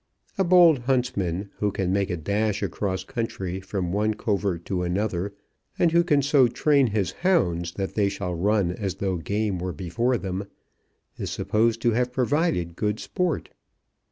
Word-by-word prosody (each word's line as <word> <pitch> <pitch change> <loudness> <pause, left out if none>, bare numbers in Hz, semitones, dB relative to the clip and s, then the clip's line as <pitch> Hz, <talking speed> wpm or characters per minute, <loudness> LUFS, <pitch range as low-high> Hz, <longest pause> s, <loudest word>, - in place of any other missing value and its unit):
A 195 - +2
bold 175 -5 +6
huntsman 105 -8 -1
who 105 -1 +1
can 95 -1 -1
make 100 -1 +1
a 90 - -2
dash 100 +5 -1
across 95 -2 -2
country 100 -7 -4
from 95 -2 -3
one 105 +2 +1
covert 100 -5 -1
to 95 -2 -2
another, 95 +1 -1 0.5
and 170 - +3
who 170 +1 +4
can 145 -5 +2
so 140 -2 +5
train 140 +3 +3
his 100 -5 -1
hounds 85 - +1
that 95 -1 -4
they 100 -2 +2
shall 90 -2 -4
run 95 +1 +1
as 95 0 -3
though 95 -2 -1
game 100 +2 -1
were 90 0 -3
before 115 +8 0
them, 95 0 -4 0.7
is - - -3
supposed 115 +2 0
to 120 - +4
have 125 +2 0
provided 125 - 0
good 105 +2 -1
sport. 180 -5 -2
105 Hz, 165 wpm, -25 LUFS, 95-125 Hz, 0.7 s, bold